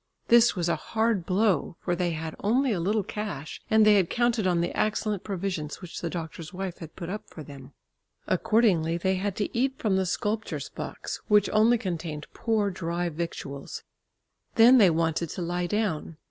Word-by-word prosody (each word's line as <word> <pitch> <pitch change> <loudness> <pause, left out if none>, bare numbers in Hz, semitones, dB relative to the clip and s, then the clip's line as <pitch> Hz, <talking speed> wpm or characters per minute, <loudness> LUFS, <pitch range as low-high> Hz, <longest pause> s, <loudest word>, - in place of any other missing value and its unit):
This 235 -1 +6
was 175 -2 -1
a 170 - +2
hard 220 -5 -1
blow, 185 -4 +1
for 175 - -1
they 175 0 0
had 160 -1 -4
only 250 +5 +2
a 195 - 0
little 205 +5 +1
cash 205 -8 -6
and 220 0 +5
they 210 -1 +6
had 185 -4 +2
counted 240 -4 +1
on 175 -2 +2
the 170 +1 -1
excellent 215 -2 0
provisions 185 -6 -3
which 180 -3 -8
the 170 - -2
doctor's 165 -2 -6
wife 190 -1 -5
had 160 -2 -10
put 170 - -6
up 210 +4 -6
for 155 - -9
them. 140 -1 -12 0.5
Accordingly 185 -5 +2
they 190 +2 +1
had 195 0 -2
to 210 - -3
eat 265 +3 +1
from 200 -4 +1
the 190 -1 0
sculptor's 210 +5 -2
box, - - -6
which 210 -2 +4
only 220 +3 +4
contained 165 -7 -4
poor 215 -3 0
dry 175 -1 -2
victuals. 150 -4 -6 0.7
Then 245 +3 +8
they 195 -5 +7
wanted 165 0 0
to 175 - -4
lie 175 +1 -1
down. 185 -6 -2
185 Hz, 185 wpm, -27 LUFS, 170-215 Hz, 0.7 s, Then